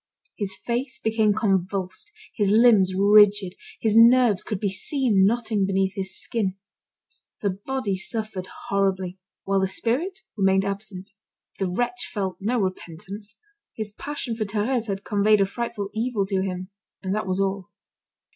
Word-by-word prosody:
His 195 -2 -3
face 240 +5 -3
became 220 -1 +2
convulsed, 195 - -1 0.2
his 205 -3 +1
limbs 210 -4 +5
rigid, 205 -1 +5 0.3
his 220 -2 +1
nerves 230 -3 +6
could 210 - -3
be 200 -1 0
seen 205 -1 +2
knotting 220 -2 0
beneath 190 0 +1
his 190 0 -2
skin. 200 -5 -1 0.9
The 200 - +1
body 205 +2 -3
suffered 195 -1 -4 0.2
horribly, 190 -2 0 0.2
while 195 0 +1
the 190 - +1
spirit 260 - -1
remained 195 -1 +3
absent. 200 0 -5 0.5
The 195 - 0
wretch 245 +6 -2
felt 190 -3 -3
no 225 +5 0
repentance. 195 +2 -5 0.4
His 215 -2 -4
passion 270 0 -4
for 220 - -1
Thérèse 220 +4 -1
had 195 -1 -3
conveyed 210 0 +3
a - - +4
frightful 210 -1 -4
evil 220 -2 -1
to 190 -1 0
him, 185 -1 -4 0.3
and 190 0 -1
that 215 -1 -2
was 185 +1 -1
all. 195 0 -1
200 Hz, 145 wpm, -24 LUFS, 190-225 Hz, 0.9 s, nerves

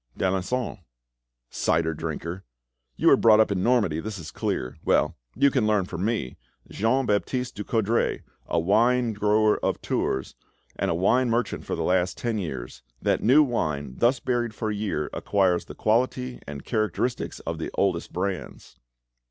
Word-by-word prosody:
"D'Alencon." 95 +5 -1 0.7
"Cider 80 0 +1
drinker! 85 +3 -5 0.5
You - - +4
were - - +8
brought 110 -1 +5
up 110 - +4
in 95 -2 0
Normandy, 105 -9 +2
that 105 +3 -5
is 80 -4 -8
clear. 60 - -3
Well, - - +2 0.2
you 140 +4 +4
can 125 -5 +1
learn 105 -3 +2
from 90 0 -5
me, 105 - -2 0.3
Jean 125 +5 +1
Baptiste 120 +4 -1
Ducoudray, 110 +1 0 0.2
a 85 - +1
wine 115 +6 +3
grower 105 +1 +2
of - - 0
Tours, 65 - -2 0.4
and - - -1
a - - +1
wine 120 +8 +2
merchant 115 -1 -1
for - - -2
the - - -2
last 90 0 +1
ten 115 -3 -2
years, 65 -7 -6 0.2
that - - +1
new 140 +7 +6
wine 75 - -2
thus 120 +2 +3
buried 120 -3 -1
for 110 -1 -2
a - - -2
year 100 -8 -2
acquires 95 -3 +1
the - - -10
quality 125 +3 0
and 70 -1 -7
characteristics 110 +2 -1
of - - -4
the - - -3
oldest 90 -4 0
brands." 95 0 -5
105 Hz, 160 wpm, -25 LUFS, 90-120 Hz, 0.7 s, were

